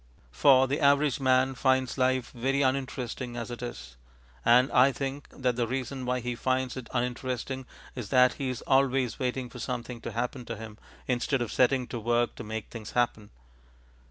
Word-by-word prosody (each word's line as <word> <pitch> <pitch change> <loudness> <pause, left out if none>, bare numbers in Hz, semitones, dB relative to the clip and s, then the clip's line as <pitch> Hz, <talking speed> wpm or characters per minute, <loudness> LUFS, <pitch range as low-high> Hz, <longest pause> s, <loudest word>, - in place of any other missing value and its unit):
For 130 - +5
the 140 +2 -1
average 140 0 +3
man 130 0 +3
finds 130 0 +1
life 130 -1 +1
very 135 +3 0
uninteresting 130 -2 -2
as 115 0 -5
it 120 - -6
is. 65 - -7 0.5
And 125 +2 +5
I 130 +2 +6
think 135 +2 -5
that 125 -2 -1
the 120 -1 +1
reason 130 +1 -4
why 125 0 0
he 125 +1 -2
finds 130 +1 -1
it 130 -2 -7
uninteresting 125 +1 -3 0.3
is 120 -6 -6
that 125 -1 +5
he 135 - -1
is 125 - -5
always 135 -3 +2
waiting 130 0 -2
for 125 +1 -11
something 120 -1 -4
to - - -5
happen 125 +2 -3
to 115 - -5
him 110 -1 -9 0.3
instead 125 +1 0
of 115 - -6
setting 130 0 +3
to 120 - -4
work 120 +2 +1
to - - -6
make 110 0 -6
things 110 -3 -8
happen. 115 -4 0
125 Hz, 185 wpm, -28 LUFS, 120-130 Hz, 0.5 s, I